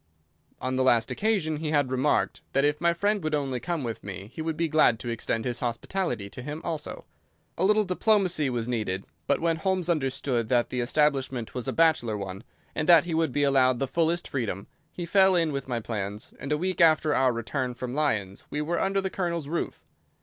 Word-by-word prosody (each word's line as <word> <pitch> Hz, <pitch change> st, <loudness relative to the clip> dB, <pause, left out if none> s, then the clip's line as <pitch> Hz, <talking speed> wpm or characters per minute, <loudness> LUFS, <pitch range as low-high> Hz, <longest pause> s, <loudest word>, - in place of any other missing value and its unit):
On 130 Hz, 0 st, -2 dB
the 130 Hz, -, +2 dB
last 120 Hz, -3 st, +3 dB
occasion 195 Hz, -8 st, 0 dB
he 155 Hz, 0 st, -3 dB
had 145 Hz, -4 st, +1 dB
remarked 130 Hz, +3 st, +1 dB
that 140 Hz, -, +3 dB
if 150 Hz, +2 st, 0 dB
my 170 Hz, 0 st, +4 dB
friend 205 Hz, +3 st, 0 dB
would 155 Hz, -1 st, 0 dB
only 135 Hz, -4 st, -2 dB
come 165 Hz, +3 st, -3 dB
with 115 Hz, -2 st, -5 dB
me 100 Hz, +1 st, -7 dB
he -, -, -5 dB
would 160 Hz, -1 st, -2 dB
be 165 Hz, +1 st, +1 dB
glad 155 Hz, -7 st, +4 dB
to 120 Hz, -, -6 dB
extend 115 Hz, -1 st, -2 dB
his 120 Hz, -1 st, -2 dB
hospitality 120 Hz, -, -2 dB
to 110 Hz, -, -9 dB
him 150 Hz, +4 st, -5 dB
also. 165 Hz, -3 st, -5 dB, 0.5 s
A 170 Hz, -, -1 dB
little 210 Hz, +2 st, +4 dB
diplomacy 185 Hz, -5 st, +2 dB
was 120 Hz, -2 st, -2 dB
needed, 105 Hz, -6 st, -2 dB, 0.2 s
but -, -, +2 dB
when 165 Hz, -1 st, +1 dB
Holmes 185 Hz, 0 st, -1 dB
understood 135 Hz, -6 st, 0 dB
that 120 Hz, -2 st, +2 dB
the 125 Hz, -, -2 dB
establishment 135 Hz, -2 st, 0 dB
was 125 Hz, -2 st, -4 dB
a -, -, 0 dB
bachelor 160 Hz, -10 st, +2 dB
one, 95 Hz, +1 st, -6 dB, 0.3 s
and 155 Hz, -, -2 dB
that 170 Hz, -2 st, +8 dB
he 170 Hz, -, -3 dB
would 160 Hz, -3 st, +1 dB
be 145 Hz, +3 st, +1 dB
allowed 130 Hz, -2 st, +4 dB
the 135 Hz, -, 0 dB
fullest 170 Hz, +4 st, 0 dB
freedom, 110 Hz, -7 st, -3 dB, 0.3 s
he 175 Hz, -, -5 dB
fell 190 Hz, +1 st, +4 dB
in 165 Hz, -3 st, +2 dB
with 140 Hz, -2 st, -4 dB
my 120 Hz, -2 st, -1 dB
plans 105 Hz, -2 st, -5 dB
and 140 Hz, +2 st, -5 dB
a 150 Hz, -, +2 dB
week 185 Hz, +3 st, -1 dB
after 155 Hz, -2 st, +5 dB
our 130 Hz, -2 st, +3 dB
return 125 Hz, +2 st, -3 dB
from 125 Hz, 0 st, -5 dB
Lyons 105 Hz, -10 st, -1 dB
we 150 Hz, -, -3 dB
were 160 Hz, +3 st, -1 dB
under 195 Hz, 0 st, +1 dB
the 190 Hz, -1 st, -3 dB
Colonel's 170 Hz, -5 st, -2 dB
roof. 170 Hz, +3 st, -4 dB
145 Hz, 215 wpm, -27 LUFS, 120-170 Hz, 0.5 s, that